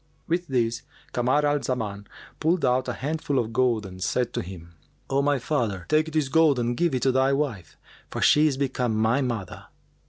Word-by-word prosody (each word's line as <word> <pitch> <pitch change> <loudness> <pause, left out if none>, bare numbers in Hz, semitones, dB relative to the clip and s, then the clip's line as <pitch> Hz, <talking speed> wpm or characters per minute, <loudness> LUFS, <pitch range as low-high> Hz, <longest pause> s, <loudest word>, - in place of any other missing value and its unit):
With 175 +1 -1
this 120 -4 0 0.3
Kamar 130 +5 +1
al 145 0 +2
Zaman 105 -5 -3 0.3
pulled 165 0 +1
out 125 0 +1
a 125 - -1
handful 145 +1 -2
of 115 -2 -1
gold 120 -3 +1
and 95 -1 -10
said 125 +5 0
to - - -1
him, 85 -2 -10 0.4
"O 135 +1 +3
my 145 0 +2
father, 115 - -2
take 155 +1 +2
this 155 -3 +1
gold 155 -1 +4
and 120 0 0
give 170 0 +1
it 125 - -1
to 135 - +4
thy 130 +1 +2
wife, 130 - -3 0.3
for - - -5
she 150 +1 +5
is 140 -3 -1
become 125 -4 -1
my 110 +5 +2
mother." 115 -8 -4
130 Hz, 195 wpm, -25 LUFS, 115-145 Hz, 0.4 s, she